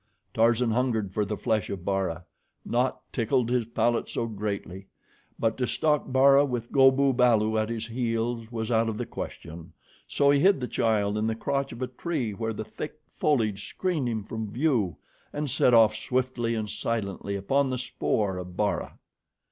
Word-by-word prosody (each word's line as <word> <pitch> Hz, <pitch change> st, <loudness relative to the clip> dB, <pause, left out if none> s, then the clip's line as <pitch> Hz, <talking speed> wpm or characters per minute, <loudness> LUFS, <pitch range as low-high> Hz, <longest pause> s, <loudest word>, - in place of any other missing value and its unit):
Tarzan 115 Hz, +1 st, +3 dB
hungered 115 Hz, -5 st, 0 dB
for 105 Hz, +1 st, 0 dB
the 105 Hz, +1 st, -3 dB
flesh 110 Hz, -3 st, 0 dB
of 95 Hz, -3 st, -5 dB
Bara. 95 Hz, -4 st, -1 dB, 0.4 s
Naught 125 Hz, +2 st, 0 dB
tickled 120 Hz, 0 st, +1 dB
his 125 Hz, -3 st, +1 dB
palate 120 Hz, 0 st, 0 dB
so 115 Hz, -, -2 dB
greatly; 100 Hz, -3 st, -5 dB, 0.5 s
but 115 Hz, -, 0 dB
to 125 Hz, -, +1 dB
stalk 150 Hz, -4 st, 0 dB
Bara 135 Hz, +2 st, +6 dB
with 120 Hz, -4 st, -3 dB
Go 135 Hz, -1 st, +7 dB
bu 135 Hz, 0 st, +2 dB
balu 115 Hz, -3 st, +3 dB
at 110 Hz, -, -3 dB
his 115 Hz, -1 st, -3 dB
heels, 115 Hz, -1 st, -2 dB
was 110 Hz, -1 st, -3 dB
out 115 Hz, 0 st, +2 dB
of 110 Hz, -, -4 dB
the 120 Hz, -, -3 dB
question, 85 Hz, -7 st, -8 dB, 0.3 s
so 140 Hz, -1 st, +3 dB
he 140 Hz, -, +4 dB
hid 195 Hz, +2 st, +4 dB
the 125 Hz, -, -3 dB
child 105 Hz, -3 st, +1 dB
in 110 Hz, -, 0 dB
the 110 Hz, -, -1 dB
crotch 140 Hz, +4 st, -2 dB
of 125 Hz, -, -5 dB
a -, -, -1 dB
tree 125 Hz, -2 st, -3 dB
where 110 Hz, +2 st, -3 dB
the 110 Hz, 0 st, -5 dB
thick 110 Hz, -, -7 dB, 0.2 s
foliage 110 Hz, -9 st, +1 dB
screened 165 Hz, -9 st, -1 dB
him 110 Hz, -3 st, -2 dB
from 110 Hz, +1 st, -5 dB
view, 120 Hz, -, +1 dB, 0.3 s
and 145 Hz, -2 st, -3 dB
set -, -, +3 dB
off 110 Hz, -2 st, +6 dB
swiftly 125 Hz, -1 st, -1 dB
and 105 Hz, -1 st, -3 dB
silently 100 Hz, -4 st, -3 dB
upon 135 Hz, +8 st, +1 dB
the 130 Hz, -, -1 dB
spoor 105 Hz, -5 st, -1 dB
of 90 Hz, 0 st, -9 dB
Bara. 105 Hz, -1 st, -1 dB
115 Hz, 180 wpm, -27 LUFS, 105-130 Hz, 0.5 s, Go